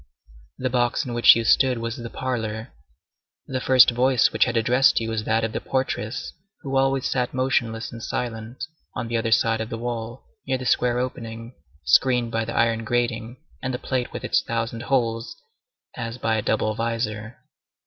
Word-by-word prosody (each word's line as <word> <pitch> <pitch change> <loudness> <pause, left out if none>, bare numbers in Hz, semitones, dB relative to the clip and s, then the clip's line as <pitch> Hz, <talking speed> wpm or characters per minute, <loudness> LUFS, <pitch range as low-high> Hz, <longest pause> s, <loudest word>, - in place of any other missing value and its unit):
The 130 -1 -2
box 120 +3 +1
in 125 - -5
which 120 0 +7
you 115 - 0
stood 130 +1 +4
was 115 0 -3
the 120 -1 -6
parlor. 110 -4 -4 0.7
The 130 -1 -3
first 130 -1 +6
voice 125 0 +3
which - - +4
had 120 -1 -1
addressed 125 +4 +4
you 115 -1 -3
was 110 -1 -2
that 110 0 +1
of 110 - -1
the - - -3
portress 130 -2 -3 0.3
who 135 -1 -4
always 135 0 +2
sat 125 -1 -1
motionless 120 -3 0
and 115 - -9
silent, 115 +1 -4 0.3
on 115 - -4
the 120 - 0
other 115 0 -1
side 115 +1 +3
of 110 - -4
the 115 - -4
wall, 120 +1 -5 0.2
near 130 -1 +1
the 130 - -7
square 120 0 +2
opening, 115 -1 -5 0.3
screened 125 -3 +3
by 115 -1 -1
the 115 - -5
iron 115 -1 +2
grating 120 0 -1 0.2
and 130 -1 -2
the - - -2
plate 125 -1 -2
with - - -6
its - - +2
thousand 115 0 -3
holes, 115 -3 -1 0.6
as 115 -1 -5
by 115 -2 0
a 110 - 0
double 110 +1 0
visor. 115 -1 -3
115 Hz, 185 wpm, -24 LUFS, 115-125 Hz, 0.7 s, which